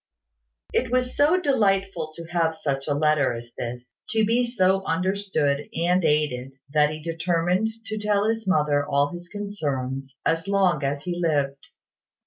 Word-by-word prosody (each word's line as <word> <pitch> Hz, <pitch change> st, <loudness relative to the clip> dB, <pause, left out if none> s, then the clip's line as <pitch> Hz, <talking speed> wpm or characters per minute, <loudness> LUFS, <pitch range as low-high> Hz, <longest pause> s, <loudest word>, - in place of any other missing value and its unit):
It 250 Hz, -2 st, 0 dB
was 250 Hz, 0 st, +1 dB
so 305 Hz, +6 st, +4 dB
delightful 195 Hz, -, +1 dB
to 170 Hz, -, -7 dB
have 165 Hz, -2 st, +1 dB
such 135 Hz, -3 st, -3 dB
a 145 Hz, -, +1 dB
letter 150 Hz, -3 st, +2 dB
as 120 Hz, +1 st, -8 dB
this, 120 Hz, +1 st, -6 dB, 0.2 s
to 220 Hz, 0 st, +2 dB
be 235 Hz, +3 st, +2 dB
so 195 Hz, -5 st, +2 dB
understood 180 Hz, -5 st, 0 dB
and 175 Hz, +2 st, +2 dB
aided, 145 Hz, -4 st, +1 dB, 0.2 s
that 150 Hz, -1 st, +4 dB
he 155 Hz, 0 st, -5 dB
determined 170 Hz, +5 st, 0 dB, 0.2 s
to 215 Hz, -1 st, -4 dB
tell 210 Hz, 0 st, +1 dB
his 225 Hz, -2 st, -1 dB
mother 150 Hz, -5 st, +2 dB
all 140 Hz, 0 st, +1 dB
his 175 Hz, +1 st, -8 dB
concerns, 135 Hz, -10 st, -4 dB
as 165 Hz, +2 st, +1 dB
long 190 Hz, -6 st, +2 dB
as 140 Hz, +1 st, -1 dB
he 175 Hz, 0 st, -3 dB
lived. 140 Hz, -4 st, 0 dB
165 Hz, 155 wpm, -24 LUFS, 145-200 Hz, 0.2 s, so